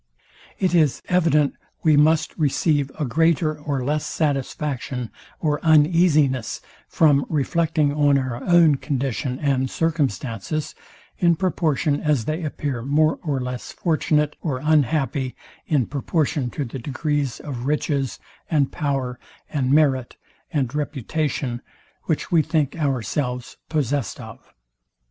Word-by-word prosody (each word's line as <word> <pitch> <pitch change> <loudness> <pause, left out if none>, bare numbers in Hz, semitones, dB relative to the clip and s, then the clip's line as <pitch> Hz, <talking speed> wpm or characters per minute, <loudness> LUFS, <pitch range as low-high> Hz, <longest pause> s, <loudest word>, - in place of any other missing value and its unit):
It 185 -2 0
is 155 -6 +2
evident 160 -5 +3 0.3
we 155 -2 +5
must 155 +2 +3
receive 145 -1 +1
a 150 - -1
greater 160 +3 +2
or 145 -3 -3
less 150 +2 0
satisfaction 135 -4 -2 0.3
or 150 -2 0
uneasiness 155 - +3 0.3
from 145 -3 +4
reflecting 155 0 +1
on 145 -1 +3
our 130 -2 -3
own 170 -5 +5
condition 130 -2 -2
and 135 -2 0
circumstances, 145 - -2 0.5
in 170 -1 +4
proportion 155 -4 0
as 145 -7 +1
they 155 +3 -2
appear 145 -4 -3
more 155 +5 +2
or 145 -5 -1
less 125 -1 -5
fortunate 150 -3 +1
or 145 -6 -2
unhappy, 140 -3 +1 0.3
in 140 -6 +2
proportion 145 0 -1
to 145 +3 -4
the 130 +2 -6
degrees 145 0 -2
of 130 -3 -5
riches, 140 -3 -1 0.3
and 145 -4 +2
power, 135 -4 -2 0.3
and 135 -3 0
merit, 135 -4 +2 0.4
and 135 -4 -1
reputation, 145 -3 -2 0.4
which 160 - -2
we 165 -2 +5
think 150 -3 0
ourselves 125 - -2
possest 145 -8 -1
of. - - -11
145 Hz, 120 wpm, -23 LUFS, 130-155 Hz, 0.5 s, we